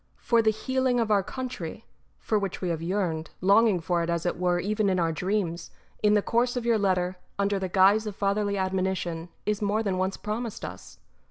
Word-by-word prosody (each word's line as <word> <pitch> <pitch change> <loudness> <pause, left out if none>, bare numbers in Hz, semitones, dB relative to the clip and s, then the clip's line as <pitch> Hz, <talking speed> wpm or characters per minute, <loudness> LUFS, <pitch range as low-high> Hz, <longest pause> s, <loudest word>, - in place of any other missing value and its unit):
For 235 -1 +2
the 220 - +3
healing 255 +3 0
of 225 -2 0
our 205 -1 +4
country, 230 -4 -6 0.3
for 215 - 0
which 195 -2 -3
we 180 - -2
have 165 -1 -2
yearned, 170 -3 -1
longing 200 +1 +4
for 170 +1 0
it 170 - -2
as 170 0 -1
it 175 - 0
were 180 -1 +2
even 205 +2 0
in 185 -1 +1
our 165 -1 +1
dreams, 180 -1 -2 0.3
in 210 0 +4
the 205 - +3
course 245 +2 +1
of 240 - -3
your 230 -2 +3
letter, 185 -2 +1 0.2
under 200 0 +1
the 190 -1 -3
guise 200 +4 +4
of 205 - -5
fatherly 200 0 0
admonition, 185 -3 -2 0.2
is 210 0 -1
more 210 +2 +1
than 190 -3 -1
once 190 +1 -1
promised 220 +1 -4
us. - - -10
195 Hz, 205 wpm, -27 LUFS, 180-215 Hz, 0.3 s, our